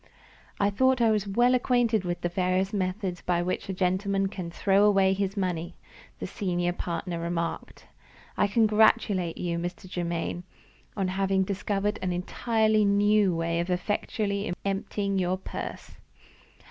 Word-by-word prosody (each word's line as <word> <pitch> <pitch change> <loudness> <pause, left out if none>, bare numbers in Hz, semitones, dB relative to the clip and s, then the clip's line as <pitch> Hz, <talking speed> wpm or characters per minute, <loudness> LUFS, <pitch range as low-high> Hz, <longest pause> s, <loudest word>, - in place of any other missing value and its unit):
"I 200 0 +2
thought 260 +4 +3
I 230 -2 +4
was 210 -2 0
well 240 +5 +3
acquainted 240 -5 +2
with 175 0 -3
the - - 0
various 185 +2 0
methods 185 -2 -2
by 175 -1 0
which 185 +2 -3
a - - -1
gentleman 195 +1 0
can 185 -4 -6
throw 195 +3 +2
away 195 -2 +4
his 195 +1 -2
money," 175 -3 -2 0.4
the - - -5
senior 175 -4 -1
partner 175 0 -4
remarked. 170 0 -4 0.5
"I - - +2
congratulate 210 -4 +3
you, 170 -1 -2
Mr. 175 +2 -5
Germaine, 175 -1 -3 0.5
on 190 -2 0
having 190 0 +1
discovered 200 +2 -1
an 185 - -1
entirely 215 +4 +1
new 205 -2 +3
way 165 0 -1
of 170 +2 -2
effectually 200 +2 -1
emptying 200 0 -1
your 185 0 0
purse. 190 - -7
195 Hz, 145 wpm, -27 LUFS, 180-205 Hz, 0.5 s, I